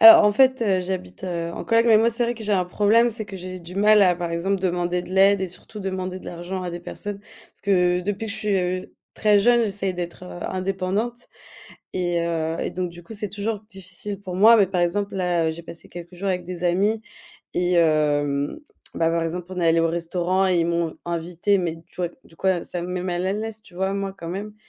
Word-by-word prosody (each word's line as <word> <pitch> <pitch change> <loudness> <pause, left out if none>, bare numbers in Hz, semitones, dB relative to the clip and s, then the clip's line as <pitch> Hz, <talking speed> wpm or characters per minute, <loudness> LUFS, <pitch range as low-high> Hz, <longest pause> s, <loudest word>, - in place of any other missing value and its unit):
Alors 225 -1 +11
en 210 - +6
fait, 260 +1 +4
heu, 190 -4 +2
j'habite, 180 - -5
heu, 170 -2 -3
en - - -6
coloc, 230 +1 +3
mais 220 -2 +7
moi 230 - +4
c'est 235 +1 0
vrai 240 +1 -1
que 225 - -9
j'ai 210 - +1
un 185 -2 +2
problème, 215 +6 +3
c'est 220 -1 -4
que 200 -2 -8
j'ai 185 0 -7
du 170 +1 -10
mal 210 +1 +6
à 180 -2 +5
par 170 -1 -4
exemple 185 +3 0
demander 175 -1 0
de - - -11
l'aide 195 +1 +5
et 190 - 0
surtout 210 +4 -9
demander 185 -1 -3
de - - -13
l'argent 175 +2 -5
à 175 - -3
des 175 - -5
personnes. 200 +3 -5
Parce - - -16
que 180 -3 +3
depuis 205 +4 -3
que 210 - -3
je - - -3
suis, 205 -2 0
heu, 185 +1 -2 0.2
très 210 -1 +4
jeune, 240 +1 +4
j'essaye 195 -2 -1
d'être, 175 -1 -5
heu, 90 -1 -8
indépendante 195 +5 -2 0.7
et 175 -2 0
heu 165 -1 -1
et - - -1
donc 180 -1 -2
du 175 0 -12
coup 225 - -10
c'est 210 -1 -1
toujours 205 +2 -3
difficile 190 0 -5
pour 185 -2 -6
moi. 220 +5 +8
Mais 200 -3 +5
par 180 -1 -1
exemple 200 +3 0
là, 175 -3 +1
heu, - - +1
j'ai 170 +1 -9
passé 165 0 -10
quelques 175 +1 -10
jours 195 +2 -2
avec 180 -1 -1
des 180 0 -6
amis 200 +5 +2 0.5
et 180 0 +1
hem, 145 - +2 0.4
bah, 165 0 +2
par 165 0 +1
exemple 170 +2 -3
on 185 -1 -4
est 170 - +2
allés 165 0 +4
au 165 - +2
restaurant 175 +3 0
et 180 -2 +3
ils 165 - +1
m'ont 170 -1 +1
v - - -14
invitée, 175 +4 0
mais 170 -2 -2
tu - - -24
vois 175 -2 -1
v - - -20
du 165 - -19
coup 190 - -4
a 180 -3 +1
ça 175 - -4
me 175 - -5
met 180 0 -2
mal 180 0 -2
à 190 - +1
l'aise 220 +1 -4
tu 185 - -18
vois, 190 +1 -1
moi, 195 -1 -2
quand 170 -3 -7
même. 205 +4 -5
185 Hz, 255 wpm, -23 LUFS, 175-205 Hz, 0.7 s, Alors